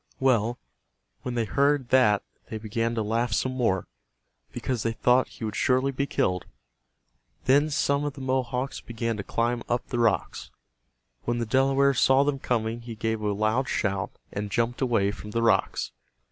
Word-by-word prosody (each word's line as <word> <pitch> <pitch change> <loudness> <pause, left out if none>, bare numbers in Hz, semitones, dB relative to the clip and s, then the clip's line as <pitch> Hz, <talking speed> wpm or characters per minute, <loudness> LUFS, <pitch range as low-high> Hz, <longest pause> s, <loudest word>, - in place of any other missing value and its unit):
Well, 120 -3 +2 0.6
when 125 -1 -4
they 115 -2 +1
heard 140 +1 +1
that 105 -6 +4 0.3
they 110 - -4
began 115 +2 -2
to 110 - 0
laugh 115 +1 0
some 130 +5 0
more, 115 -8 0 0.6
because 125 -4 -2
they 115 +1 -1
thought 125 +3 +3
he - - -11
would 110 - -4
surely 130 +2 +2
be 140 +1 -2
killed. 90 -7 0 1.0
Then 145 +4 +4
some 140 -1 +1
of 145 - -2
the 135 - -10
Mohawks 130 0 -1
began 115 0 -3
to 100 - -4
climb 120 +4 -1
up 120 0 0
the 120 - -2
rocks. 115 -4 0 0.8
When 120 0 0
the 120 - -1
Delaware 135 +3 +3
saw 135 +1 +4
them 140 -1 -1
coming 115 -2 -1
he 115 -1 -8
gave 110 0 -2
a 105 -1 0
loud 110 +6 0
shout 95 -2 -1 0.2
and 105 0 -3
jumped 120 +2 -1
away 115 -6 +2
from 105 - -9
the 115 +2 -1
rocks. 115 - +1
120 Hz, 175 wpm, -26 LUFS, 110-130 Hz, 1.0 s, that